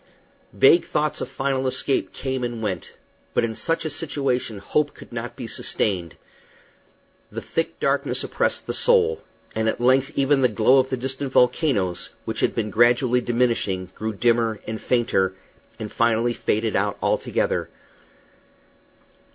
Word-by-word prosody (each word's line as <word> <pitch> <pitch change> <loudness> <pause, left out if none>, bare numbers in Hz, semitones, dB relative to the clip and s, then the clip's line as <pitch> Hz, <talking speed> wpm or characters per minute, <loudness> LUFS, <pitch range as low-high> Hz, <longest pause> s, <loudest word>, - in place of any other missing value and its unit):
Vague 135 - +5
thoughts 150 0 -1
of - - -4
final 135 -1 -1
escape 135 +1 0
came 130 -1 -3
and 120 -2 -4
went; 100 -4 -4 0.4
but - - +3
in 115 -1 -1
such 165 +8 -2
a - - -1
situation 135 -7 -2
hope 145 +9 -1
could - - -13
not 120 0 -5
be 125 - -6
sustained. 95 -6 -2 1.2
The - - -4
thick 165 - -3
darkness - - 0
oppressed - - -1
the - - -3
soul; 465 -2 +4 0.3
and 110 0 0
at - - -3
length 130 +3 +3
even 140 0 +3
the 130 - +5
glow 115 +4 +4
of 130 0 +1
the 130 - -1
distant 135 +2 -4
volcanoes, 125 - +1 0.2
which - - -3
had - - +1
been 105 -2 -2
gradually 120 +3 +3
diminishing, 115 -7 0
grew 110 +1 -4
dimmer 115 0 +1
and 110 0 -5
fainter, 95 -6 +1 0.4
and 110 -2 -6
finally 115 +1 +2
faded 110 -1 -1
out 100 0 0
altogether. - - 0
120 Hz, 150 wpm, -23 LUFS, 110-135 Hz, 1.2 s, Vague